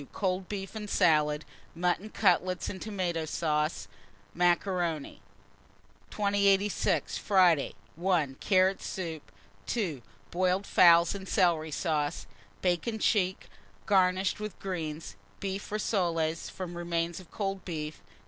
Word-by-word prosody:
Cold 185 -1 -1
beef 195 -2 -5
and 210 -2 -6
salad; 150 -5 +3 0.3
mutton 180 +4 0
cutlets 185 -3 +1
and 190 - -7
tomata 180 -6 -2
sauce. 155 0 -1 0.5
3. - - -15
Macaroni. 175 - 0 0.9
2086. 200 -1 +1
Friday. 180 -7 +3 0.2
1. 165 -6 0
Carrot 190 0 +3
soup. 165 -5 -5 0.4
2. 175 - -2 0.3
Boiled 185 +2 +1
fowls 170 -2 +6
and 195 -2 -7
celery 160 -3 +2
sauce; 150 -1 -1 0.4
bacon 180 +5 0
check, 190 -3 +1 0.4
garnished 190 0 +2
with 210 -3 -6
greens; 165 -4 -5 0.2
beef 195 +1 -4
rissoles, 170 -6 0
from 180 -2 -6
remains 170 0 -2
of 185 - -14
cold 195 -2 -3
beef. 155 -3 -5
180 Hz, 110 wpm, -29 LUFS, 165-195 Hz, 0.9 s, fowls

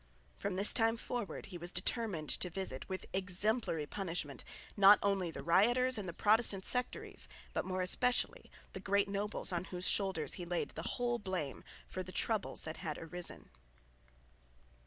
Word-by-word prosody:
From 200 -2 -3
this 200 +2 +6
time 225 -1 +3
forward 235 -2 -4
he 180 -3 -8
was 175 +1 -3
determined 180 -4 -2
to 180 - +2
visit 175 -6 -4
with 190 0 -4
exemplary 190 -2 +1
punishment 165 -5 -4 0.3
not 200 0 +8
only 195 -3 +1
the 160 - -7
rioters 240 +9 +3
and 200 -5 -3
the - - -3
Protestant 205 +1 +3
sectaries, 250 0 -1 0.3
but - - -1
more 185 0 -2
especially 250 +7 +2 0.2
the - - -6
great 200 +1 +1
nobles 200 0 -1
on 175 0 -2
whose 180 -1 -1
shoulders 190 -6 +1
he - - -3
laid 175 0 -2
the - - -6 0.2
whole 240 -1 0
blame 185 -9 -4 0.2
for 185 - -5
the 185 0 -8
troubles 215 +1 0
that 155 0 -6
had 155 -2 -4
arisen. 175 +2 -3
190 Hz, 160 wpm, -34 LUFS, 175-210 Hz, 0.3 s, not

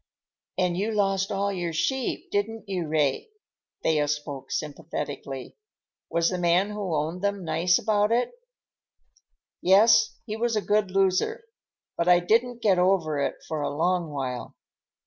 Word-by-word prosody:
"And 180 -2 +1
you 205 +5 -1
lost 195 -1 +1
all 200 0 0
your 175 -3 -3
sheep, 260 +10 -2
didn't 220 +2 -2
you, 180 -4 -2
Ray?" 150 - 0 0.5
Thea 150 -2 +2
spoke 145 -2 -4
sympathetically. 145 -3 -5 0.5
"Was 170 0 +1
the 180 - -2
man 180 +4 +2
who 200 -5 -3
owned 160 +4 -2
them 200 -1 -1
nice 165 +3 +2
about 210 0 +1
it?" 240 +1 +1 1.3
"Yes, 200 +5 +5
he 215 - -4
was 230 0 0
a 210 - +1
good 210 -1 +1
loser. 195 - +1 0.5
But 170 - 0
I 175 -1 +7
didn't 235 +6 +1
get 190 -4 +4
over 180 -5 +2
it 140 - -2
for 155 -2 -3
a 145 - -1
long 170 +2 0
while. 130 -4 -5
180 Hz, 145 wpm, -26 LUFS, 155-205 Hz, 1.3 s, I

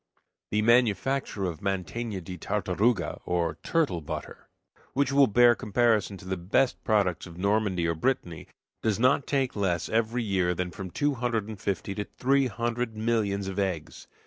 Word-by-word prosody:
The 105 +1 +1
manufacture 120 -1 +2
of 85 -4 -3
"manteigna 100 +2 -3
de 90 +2 -7
tartaruga," 100 +2 0
or 85 -2 -1
turtle 150 - 0
butter, 80 0 -7 0.4
which 140 0 +1
will 140 0 +6
bear 120 +3 +6
comparison 110 -2 +1
with 95 - -12
the 95 0 -2
best 95 +9 +1
products 100 -5 +1
of 85 -1 -12
Normandy 100 -2 +1
or 85 - +1
Brittany, 85 -4 -2 0.3
does 110 -1 0
not 130 +3 +3
take 135 -3 0
less 95 -4 0
every 115 +2 0
year 95 -4 +1
that 90 -1 -3
from 95 +1 -6
two 145 +10 0
hundred 115 -4 -1
and 110 -3 -8
fifty 100 0 -2
to 105 +1 -4
three 135 +1 +3
hundred 115 +1 -2
millions 105 -3 0
of 95 +1 -3
eggs. 90 -5 -3
105 Hz, 165 wpm, -27 LUFS, 90-120 Hz, 0.4 s, will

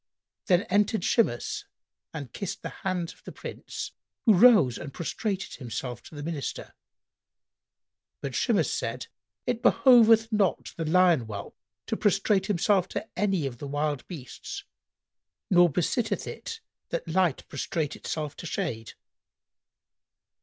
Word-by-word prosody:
Then 180 +1 +4
entered 205 +2 +1
Shimas 165 - +1 0.5
and 140 -7 -7
kissed 195 - -5
the - - -3
hands 180 -3 -2
of - - -26
the - - -8
Prince, - - -7 0.3
who 220 - +7
rose 195 - +6
and 140 - -7
prostrated 195 +6 -3
himself 125 -1 -5
to - - -13
the 145 - -6
Minister: 150 -5 -4 1.5
but 135 -2 -5
Shimas 185 - +2
said, 115 +2 -3 0.4
"It 245 -2 -1
behoveth 230 -4 +6
not 205 -4 +1
the 165 - -3
lion 170 -6 +4
whelp 100 -2 -7 0.3
to - - -1
prostrate 195 -1 +2
himself 195 -1 +2
to - - -4
any 190 -5 +1
of 120 -3 -5
the 145 - -5
wild 145 -1 -2
beasts, 150 -9 -7 0.9
nor 175 -1 +7
besitteth 195 - 0
it 455 0 -7 0.3
that - - -3
Light 170 -3 +1
prostrate 150 +2 -2
itself 150 -2 -4
to 170 - -6
shade." 120 - -3
175 Hz, 130 wpm, -27 LUFS, 140-205 Hz, 1.5 s, who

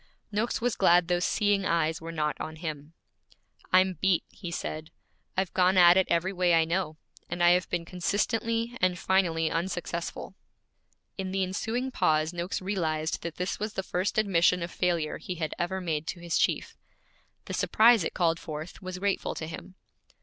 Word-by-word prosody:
Noakes 215 +3 -1
was 245 0 0
glad 175 -2 +4
those 175 0 +1
seeing 205 -2 +2
eyes 165 -2 0
were 165 +1 -6
not 150 -2 -1
on 160 0 -5
him. 155 -2 -6 0.8
'I'm 185 -2 +4
beat,' 190 -3 +3
he 180 - -8
said. 155 -1 -5 0.5
'I've 190 -1 0
gone 185 0 +3
at 175 -1 +8
it 190 0 +3
every 175 +3 +1
way 180 -2 +3
I 165 -1 +4
know, 165 -2 -2 0.3
and 175 0 -1
I 175 - +7
have 180 0 +2
been 175 -1 -2
consistently 225 +6 -1
and 180 -1 +2
finally 170 -4 +1
unsuccessful.' 170 0 -3 0.9
In 190 -1 -2
the 190 0 0
ensuing 225 +7 -2
pause 155 -5 +1
Noakes 175 +2 -3
realized 160 -5 -1
that 170 -1 -5
this 180 +1 -3
was 215 +1 -3
the 190 - -3
first 185 +3 -2
admission 180 -4 +3
of 170 - -5
failure 170 -4 -1
he 180 +3 -5
had 160 -3 -3
ever 190 +2 -1
made 160 -3 -2
to 175 - -4
his 170 -1 -3
chief. - - 0 0.7
The - - -6
surprise 225 -2 +5
it - - -4
called 165 -2 +2
forth 155 +2 -7
was 185 -1 -6
grateful 200 +1 -1
to 160 - -4
him. 165 +3 -9
180 Hz, 180 wpm, -28 LUFS, 165-190 Hz, 0.9 s, at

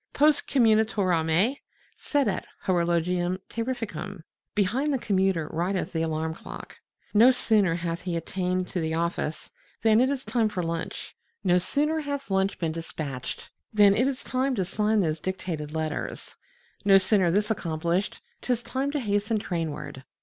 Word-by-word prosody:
Post 295 0 +3
commutatorem 215 - +3 0.4
sedet 260 -11 0 0.2
horologium 175 0 +1
terrificum, 225 -7 -4 0.3
behind 230 +9 +1
the 275 - +2
commuter 190 -8 +1
rideth 180 +4 -1
the 160 - 0
alarm 160 0 -1
clock, - - -10 0.3
no 225 +4 +7
sooner 215 -8 +3
hath 170 0 -3
he 180 -2 -2
attained 180 +2 -2
to 180 - -2
the 160 -1 -1
office 165 -2 -2 0.3
than 220 +1 +5
it 260 - +3
is 275 -2 -3
time 230 -3 +1
for 185 -4 -3
lunch, 165 0 -4 0.3
no 180 -2 +4
sooner 300 - 0
hath 285 -5 -4
lunch 190 +1 +1
been 165 -2 -1
dispatched 155 -5 -5 0.2
than 205 -2 +6
it 245 +6 +2
is 270 -2 -3
time 260 +1 0
to 190 -4 0
sign 210 +3 +1
those 155 -3 0
dictated 170 -4 -4
letters, 155 -1 -4 0.5
no 195 -1 +7
sooner 190 -1 +3
this 205 +5 +1
accomplished, 170 0 -1 0.2
'tis 245 -2 -1
time 265 +3 -2
to 295 +1 -1
hasten 210 -1 0
trainward. 155 -8 -4
190 Hz, 150 wpm, -27 LUFS, 170-225 Hz, 0.5 s, no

